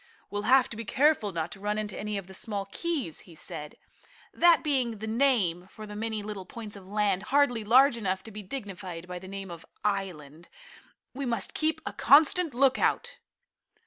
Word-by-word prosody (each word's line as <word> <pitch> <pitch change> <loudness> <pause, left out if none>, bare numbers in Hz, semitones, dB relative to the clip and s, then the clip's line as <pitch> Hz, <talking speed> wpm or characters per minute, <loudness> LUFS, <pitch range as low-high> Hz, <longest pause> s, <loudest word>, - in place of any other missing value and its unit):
"We'll 205 +2 -2
have 265 0 +6
to - - -7
be 230 - -5
careful 270 -3 +2
not 165 -2 -3
to - - -9
run 210 +1 -1
into 210 -2 -3
any 210 0 -3
of 195 - -5
the 190 - -12
small 200 0 -3
keys," 305 - -2
he 165 - -13
said, 150 -1 -7 0.6
that 345 -1 +5
being 255 -7 0
the 215 - -6
name 220 -8 +1
for 215 +2 -10
the 210 0 -9
many 220 0 -3
little 205 -2 -6
points 215 -2 -8
of 195 -2 -12
land, 200 -2 +1
hardly 270 -5 +3
large 250 +4 +5
enough 190 -3 -2
to 225 - -10
be 210 0 -7
dignified 190 -6 -6
by 180 0 -6
the 185 - -11
name 195 -1 -6
of 170 -1 -9 0.2
island. 175 -6 -3 0.6
"We 270 0 -4
must 230 -4 -1
keep 315 0 0
a - - -4
constant 310 +1 +4
lookout." 265 0 +2
210 Hz, 190 wpm, -28 LUFS, 190-255 Hz, 0.6 s, have